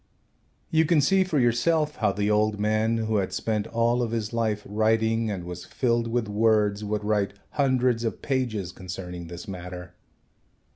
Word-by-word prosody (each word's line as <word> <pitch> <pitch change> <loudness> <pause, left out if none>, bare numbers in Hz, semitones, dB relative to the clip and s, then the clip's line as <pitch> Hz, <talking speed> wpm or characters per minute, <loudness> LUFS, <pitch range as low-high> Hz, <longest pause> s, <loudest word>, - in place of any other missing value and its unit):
You 160 0 +4
can 160 0 +3
see 190 +7 +4
for 185 -5 -1
yourself 150 +6 +2
how - - +2
the 105 +2 0
old 105 0 +2
man, 110 +2 +1
who 110 -1 0
had 95 -2 -1
spent 110 -2 -1
all 115 +1 +1
of 120 - -1
his 115 -1 -3
life 110 -3 0
writing 110 +1 +1
and 95 -4 -3
was 90 0 -7
filled 120 -2 0
with 115 -1 -1
words, 105 -1 +2
would 105 0 -2
write 105 -1 0 0.2
hundreds 130 -4 +2
of 115 - -2
pages 120 -9 -1
concerning 90 -2 -7
this 85 +1 -9
matter. 90 -2 -7
110 Hz, 165 wpm, -26 LUFS, 105-120 Hz, 0.2 s, You